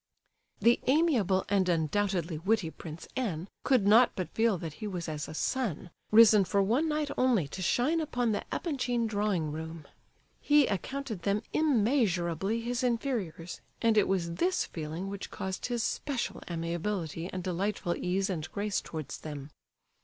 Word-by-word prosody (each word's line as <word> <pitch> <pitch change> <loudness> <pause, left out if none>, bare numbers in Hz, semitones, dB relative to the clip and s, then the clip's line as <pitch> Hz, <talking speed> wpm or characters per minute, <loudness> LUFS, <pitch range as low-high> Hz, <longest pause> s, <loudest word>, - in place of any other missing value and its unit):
The 235 +1 +4
amiable 255 - +3
and 190 -2 +2
undoubtedly 170 0 0
witty 190 -2 +1
Prince 160 0 -9
N. 190 -9 -2 0.2
could 255 -7 +3
not 225 +4 +6
but 185 - -4
feel 225 -3 +2
that 165 -2 -6
he 215 - -2
was 180 -4 -4
as 150 -1 -4
a - - -8
sun, 190 - -2 0.2
risen 215 -2 +7
for 200 +2 +2
one 255 +11 +1
night 300 -1 -1
only 240 - +3
to 185 - -6
shine 265 - +2
upon 245 -6 0
the 205 - -1
Epanchin 250 -7 -1
drawing 205 -7 0
room. 160 0 -6 0.5
He 295 -1 +5
accounted 225 +1 -3
them 200 +4 0
immeasurably 215 - +1
his 245 +2 -2
inferiors, 230 - -2 0.2
and 230 -1 +3
it 210 - +4
was 175 -3 0
this 365 - +1
feeling 160 +3 -5
which 200 0 -6
caused 190 -1 -4
his 240 -2 -1
special 270 0 -2
amiability 170 0 -3
and 185 -1 -4
delightful 185 0 -1
ease 190 +2 0
and 165 -5 -4
grace 205 -1 -1
towards 155 -3 -6
them. 145 -2 -7
200 Hz, 155 wpm, -30 LUFS, 170-240 Hz, 0.5 s, risen